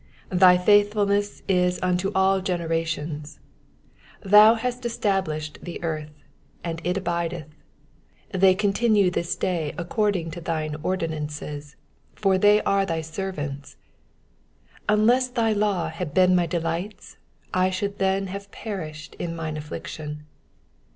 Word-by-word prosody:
90 180 Hz, -, 0 dB
Thy 180 Hz, -1 st, +8 dB
faithfulness 205 Hz, +1 st, +2 dB
is 180 Hz, -1 st, +2 dB
unto 180 Hz, +2 st, +1 dB
all 190 Hz, 0 st, +3 dB
generations: 165 Hz, -4 st, -3 dB, 0.8 s
^thou 210 Hz, +3 st, +7 dB
hast 250 Hz, +2 st, -3 dB
es 235 Hz, -1 st, -3 dB
tablished 155 Hz, -7 st, -1 dB
the 175 Hz, -, -7 dB
earth, 155 Hz, -2 st, -3 dB, 0.5 s
and 165 Hz, -1 st, -4 dB
it 180 Hz, +2 st, 0 dB
abideth. 170 Hz, -3 st, -2 dB, 0.9 s
91 190 Hz, -, -2 dB
They 190 Hz, -1 st, +6 dB
continue 205 Hz, -1 st, +2 dB
this 170 Hz, -1 st, -1 dB
day 165 Hz, -5 st, -2 dB
according 180 Hz, -1 st, -1 dB
to 175 Hz, +1 st, -7 dB
thine 155 Hz, -2 st, -2 dB
ordinances: 150 Hz, -4 st, -4 dB, 0.4 s
for 195 Hz, -2 st, +2 dB
all 210 Hz, +1 st, +6 dB
are 195 Hz, 0 st, +3 dB
thy 165 Hz, -4 st, -2 dB
servants. 155 Hz, -4 st, -5 dB, 1.1 s
92 -, -, +5 dB
Unless 245 Hz, +4 st, +4 dB
thy 230 Hz, -3 st, +1 dB
law 200 Hz, -6 st, 0 dB
Aad 160 Hz, -5 st, -4 dB
been 185 Hz, -1 st, +5 dB
my 175 Hz, -1 st, +2 dB
delights, 170 Hz, +4 st, -4 dB, 0.4 s
I 185 Hz, 0 st, +3 dB
should 200 Hz, +2 st, -3 dB
then 195 Hz, 0 st, +1 dB
have 200 Hz, +1 st, -7 dB
perished 160 Hz, -9 st, -7 dB
in 170 Hz, -1 st, -3 dB
mine 160 Hz, -2 st, -4 dB
affliction. 150 Hz, 0 st, -7 dB
180 Hz, 130 wpm, -24 LUFS, 160-200 Hz, 1.1 s, Thy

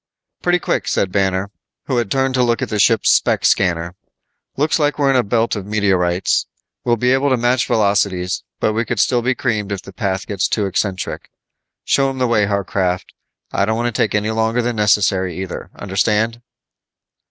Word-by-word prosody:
"Pretty 175 Hz, 0 st, +2 dB
quick," -, -, -2 dB
said 95 Hz, -, 0 dB
Banner, 95 Hz, 0 st, 0 dB, 0.3 s
who 130 Hz, -, -1 dB
had 120 Hz, -4 st, 0 dB
turned 135 Hz, +3 st, +1 dB
to 130 Hz, -, +2 dB
look 120 Hz, -1 st, +1 dB
at -, -, -4 dB
the 105 Hz, -, -2 dB
ship's 110 Hz, +2 st, +4 dB
spec -, -, +2 dB
scanner. 85 Hz, -2 st, +1 dB, 0.6 s
"Looks 150 Hz, +4 st, +1 dB
like 150 Hz, -1 st, +1 dB
we're 140 Hz, -2 st, +3 dB
in -, -, +1 dB
a 130 Hz, -, +5 dB
belt 115 Hz, +1 st, 0 dB
of 100 Hz, -2 st, -6 dB
meteorites. 95 Hz, -4 st, +1 dB, 0.4 s
We'll 120 Hz, -, +2 dB
be 125 Hz, +3 st, +2 dB
able 135 Hz, +2 st, +2 dB
to 130 Hz, -, +2 dB
match 120 Hz, +1 st, +1 dB
velocities, 100 Hz, -4 st, +1 dB, 0.2 s
but 110 Hz, -, +1 dB
we 115 Hz, +2 st, 0 dB
could 120 Hz, -2 st, -3 dB
still 120 Hz, +3 st, +2 dB
be 125 Hz, +2 st, 0 dB
creamed 105 Hz, -4 st, -2 dB
if 100 Hz, -2 st, -4 dB
the 100 Hz, -, -12 dB
path 95 Hz, -2 st, -2 dB
gets 100 Hz, -3 st, -1 dB
too 105 Hz, -, 0 dB
eccentric. 95 Hz, 0 st, -3 dB, 0.5 s
Show 135 Hz, -1 st, +2 dB
him 135 Hz, -, -5 dB
the 130 Hz, -, +1 dB
way, 110 Hz, -4 st, +2 dB
Harcraft. 95 Hz, -2 st, -1 dB, 0.4 s
I 100 Hz, -, +1 dB
don't 110 Hz, +2 st, -1 dB
want 120 Hz, 0 st, -1 dB
to -, -, 0 dB
take 105 Hz, -, +1 dB
any 105 Hz, +1 st, 0 dB
longer 110 Hz, +2 st, 0 dB
than 120 Hz, 0 st, -1 dB
necessary, 95 Hz, -4 st, +2 dB
either. 95 Hz, -2 st, -6 dB
Understand?" 105 Hz, +4 st, 0 dB
105 Hz, 195 wpm, -18 LUFS, 95-120 Hz, 0.6 s, a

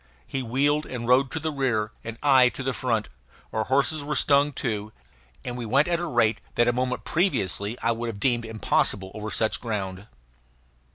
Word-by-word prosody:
He 135 Hz, -, -3 dB
wheeled 145 Hz, +5 st, +1 dB
and 120 Hz, -2 st, -5 dB
rode 130 Hz, +2 st, +4 dB
to 160 Hz, -, -4 dB
the 160 Hz, 0 st, -2 dB
rear 120 Hz, -7 st, 0 dB
and 115 Hz, 0 st, -6 dB
I 130 Hz, -3 st, +6 dB
to 135 Hz, -, -4 dB
the 135 Hz, 0 st, -1 dB
front; 115 Hz, -5 st, -1 dB, 0.5 s
our 110 Hz, -1 st, 0 dB
horses 140 Hz, +4 st, +2 dB
were 150 Hz, +1 st, -2 dB
stung 140 Hz, +1 st, +3 dB
too; 110 Hz, -5 st, -3 dB, 0.5 s
and 120 Hz, -, -4 dB
we 125 Hz, -, -5 dB
went 140 Hz, +6 st, +3 dB
at 170 Hz, -1 st, +1 dB
a 175 Hz, -, -3 dB
rate 115 Hz, -2 st, +2 dB
that 120 Hz, -, +3 dB
a 120 Hz, -, +3 dB
moment 125 Hz, +1 st, -2 dB
previously 115 Hz, -, 0 dB
I 115 Hz, -, +3 dB
would 115 Hz, +1 st, -3 dB
have 110 Hz, -3 st, -5 dB
deemed 120 Hz, 0 st, +2 dB
impossible 100 Hz, -3 st, +1 dB
over 110 Hz, 0 st, -5 dB
such 110 Hz, +1 st, 0 dB
ground. 100 Hz, -4 st, -4 dB
125 Hz, 190 wpm, -25 LUFS, 110-140 Hz, 0.5 s, I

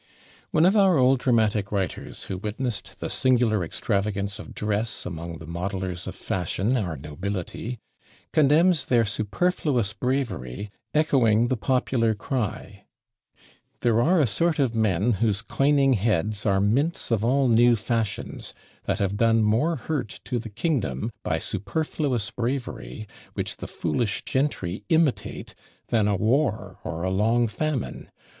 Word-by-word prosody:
One 155 Hz, -, +4 dB
of 190 Hz, +4 st, +4 dB
our 195 Hz, -5 st, +5 dB
old 130 Hz, 0 st, +4 dB
dramatic 110 Hz, -5 st, +2 dB
writers, 95 Hz, -4 st, -3 dB
who 95 Hz, -, -5 dB
witnessed 110 Hz, +2 st, -4 dB
the -, -, -2 dB
singular 120 Hz, -6 st, +2 dB
extravagance 100 Hz, +3 st, -2 dB
of -, -, -10 dB
dress 105 Hz, +2 st, -1 dB
among 85 Hz, -1 st, -5 dB
the 80 Hz, -, -10 dB
modellers 90 Hz, +2 st, -4 dB
of 95 Hz, -, -5 dB
fashion, 95 Hz, +7 st, -1 dB
our 90 Hz, -, -1 dB
nobility, 90 Hz, -, -5 dB, 0.6 s
condemns 155 Hz, +3 st, +4 dB
their 120 Hz, -2 st, +4 dB
"superfluous 110 Hz, -, 0 dB
bravery," 105 Hz, -, -2 dB, 0.2 s
echoing 120 Hz, -7 st, +3 dB
the 130 Hz, -, +2 dB
popular 120 Hz, -2 st, +1 dB
cry 115 Hz, 0 st, -4 dB, 1.0 s
"There 115 Hz, -1 st, +3 dB
are 175 Hz, +7 st, +4 dB
a 150 Hz, -, +5 dB
sort 155 Hz, +10 st, +1 dB
of 135 Hz, -5 st, +1 dB
men, 110 Hz, -1 st, +2 dB
whose 105 Hz, -1 st, 0 dB
coining 135 Hz, +2 st, +3 dB
heads 105 Hz, -1 st, 0 dB
Are 95 Hz, -1 st, +3 dB
mints 125 Hz, -, +1 dB
of 110 Hz, -2 st, +2 dB
all 135 Hz, +3 st, +3 dB
new 120 Hz, +1 st, +5 dB
fashions, 115 Hz, -1 st, -3 dB, 0.3 s
that -, -, 0 dB
have 100 Hz, 0 st, -1 dB
done 115 Hz, 0 st, +4 dB
More 120 Hz, +11 st, +2 dB
hurt 140 Hz, -11 st, -4 dB
to 125 Hz, -2 st, -1 dB
the 115 Hz, 0 st, -7 dB
kingdom, 105 Hz, -, -1 dB
by -, -, 0 dB
superfluous 125 Hz, -, -2 dB
bravery, 120 Hz, -3 st, -4 dB, 0.3 s
Which -, -, -3 dB
the -, -, -6 dB
foolish 95 Hz, +6 st, -1 dB
gentry 120 Hz, -9 st, -1 dB
imitate, 160 Hz, -5 st, 0 dB, 0.4 s
than 110 Hz, -3 st, +3 dB
a 105 Hz, -, +2 dB
war 110 Hz, -1 st, 0 dB
Or 80 Hz, +2 st, -4 dB
a 95 Hz, -, 0 dB
long 115 Hz, +5 st, +2 dB
famine. 145 Hz, +3 st, -3 dB
115 Hz, 140 wpm, -25 LUFS, 100-130 Hz, 1.0 s, our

